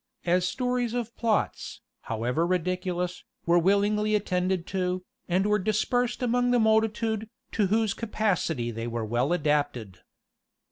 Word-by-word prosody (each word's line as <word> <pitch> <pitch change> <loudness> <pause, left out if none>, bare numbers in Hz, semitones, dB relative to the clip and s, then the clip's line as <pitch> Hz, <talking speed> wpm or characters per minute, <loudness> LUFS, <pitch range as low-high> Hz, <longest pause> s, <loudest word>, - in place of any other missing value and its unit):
As 180 +1 +2
stories 250 0 -1
of 235 -1 -3
plots, 225 -3 -1 0.2
however 125 +9 0
ridiculous, 180 0 -1 0.2
were 170 +1 +4
willingly 205 +3 +2
attended 185 -3 0
to, 185 -1 -1 0.3
and 185 +3 +2
were 210 0 +2
dispersed 235 +5 0
among 245 0 +2
the 245 - +4
multitude, 220 0 +1 0.2
to 210 -3 +1
whose 215 +1 +1
capacity 180 - -1
they 115 +1 -4
were 115 -1 -3
well 120 +6 0
adapted. 145 - 0
190 Hz, 130 wpm, -27 LUFS, 170-220 Hz, 0.3 s, were